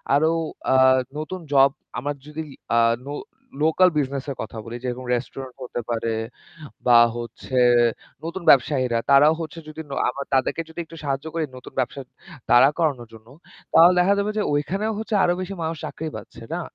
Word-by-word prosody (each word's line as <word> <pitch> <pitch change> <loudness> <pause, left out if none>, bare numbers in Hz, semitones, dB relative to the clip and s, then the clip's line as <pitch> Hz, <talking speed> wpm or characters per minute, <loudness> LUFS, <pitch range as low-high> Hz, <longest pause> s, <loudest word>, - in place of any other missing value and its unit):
আরো 155 +3 +3 0.4
আ - - +5 0.4
নতুন 155 +5 -5
জব 135 0 +6 0.3
আমার 145 +3 -3
যদি 155 +1 -5 0.3
আ - - +4 0.3
লো 145 - -4 0.5
লোকাল 180 +4 +5
বিজনেস 140 -2 -1
এর 135 - -5
কথা 110 - -7
বলি, 115 +1 -7
যেরকম 125 0 -4
রেস্টুরেন্ট 130 +1 -6
হতে 120 - -4
পারে 115 -1 -1 0.7
বা 120 -1 +8 0.2
হচ্ছে 120 +2 -4 0.7
নতুন 170 +2 -5
ব্যবসায়ীরা 130 -3 +4
তারাও 145 +3 +7
হচ্ছে 160 +1 -7
যদি 155 +1 -7
ন - - -11 0.2
আমরা 140 +3 -4
তাদেরকে 135 +5 +1
যদি 160 - -9
একটু 165 - -13
সাহায্য 140 0 -2
করি 165 -1 -1
নতুন 125 - -12
ব্যবসা 130 +2 -2 0.5
দাড়া 130 +3 +7
করানোর 140 -8 0
জন্য, 110 0 -15 0.5
তাহলে 170 +3 +8
দেখা 190 +3 +4
যাবে 205 +1 0
যে 215 - +2
ওইখানেও 195 +10 -1
হচ্ছে 220 0 -2
আরো 175 - +3
বেশি 185 +2 -5
মানুষ 160 0 -3
চাকরি 160 0 -5
পাচ্ছে, - - -10
না? - - -2
140 Hz, 170 wpm, -23 LUFS, 125-160 Hz, 0.7 s, বা